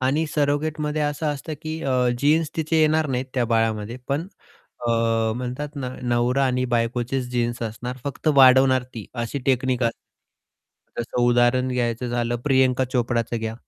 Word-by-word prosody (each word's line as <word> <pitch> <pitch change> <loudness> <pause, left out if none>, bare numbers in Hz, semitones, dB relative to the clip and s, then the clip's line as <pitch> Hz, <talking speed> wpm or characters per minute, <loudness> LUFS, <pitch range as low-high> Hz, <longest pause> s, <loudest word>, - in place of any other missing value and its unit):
आणि 140 +5 +1
सरोगेटमध्ये 150 +1 0
असं 150 +1 -1
असतं, 150 +2 -3
की 155 +1 -4
अ, 130 -2 +1
जीन्स 150 +3 +2
तिचे 160 0 +1
येणार 155 0 +3
नाहीत. 130 -1 -1
त्या 125 - +2
बाळामध्ये, 115 0 0
पण 145 +5 -1 0.6
अ, 120 - +1 0.5
म्हणतात 125 +4 -5 0.3
नवरा 120 +2 +1
आणि 125 0 0
बायकोचेच 120 +2 -1
जीन्स 120 -1 -1
असणार. 120 +3 -5
फक्त 140 +2 -2
वाढवणार 130 -1 +6
ती 110 -4 -7
अशी 120 +3 -3
टेक्निक 130 -1 +1
अ - - +4 1.1
जसं 120 +1 -2
उदाहरण 120 +1 +3
घ्यायचं 120 -1 -1
झालं, 120 0 -1
प्रियंका 130 -2 +3
चोप्राचं 120 -1 0
घ्या. 110 0 -3
130 Hz, 145 wpm, -23 LUFS, 120-145 Hz, 1.1 s, वाढवणार